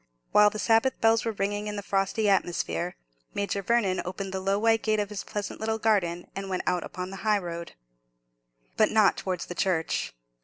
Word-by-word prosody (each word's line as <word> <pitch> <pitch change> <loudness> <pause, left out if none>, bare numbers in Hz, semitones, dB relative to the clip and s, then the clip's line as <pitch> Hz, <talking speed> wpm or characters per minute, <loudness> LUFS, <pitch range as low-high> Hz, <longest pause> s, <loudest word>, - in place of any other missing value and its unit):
While 210 0 +7
the 215 - -7
Sabbath 225 +4 +2
bells 225 0 +3
were 225 - 0
ringing 205 0 -2
in 210 - -3
the 205 - -4
frosty 195 +3 0
atmosphere, 180 -2 0 0.4
Major 200 0 -1
Vernon 200 -3 +1
opened 190 +1 -5
the 190 - -1
low 195 +1 +1
white 225 +1 +3
gate 215 -1 +1
of 205 -1 -1
his 210 -2 -5
pleasant 205 -2 -5
little 220 0 -1
garden, 190 -6 +1
and 195 0 -5
went 185 -1 -2
out 180 -1 +1
upon 185 +1 -6
the 195 - -7
high 215 +1 +2
road. 170 -3 -6 1.0
But 215 - +5
not 215 -2 +4
towards 185 -2 -3
the - - -6
church. 175 -2 0
200 Hz, 195 wpm, -27 LUFS, 185-215 Hz, 1.0 s, While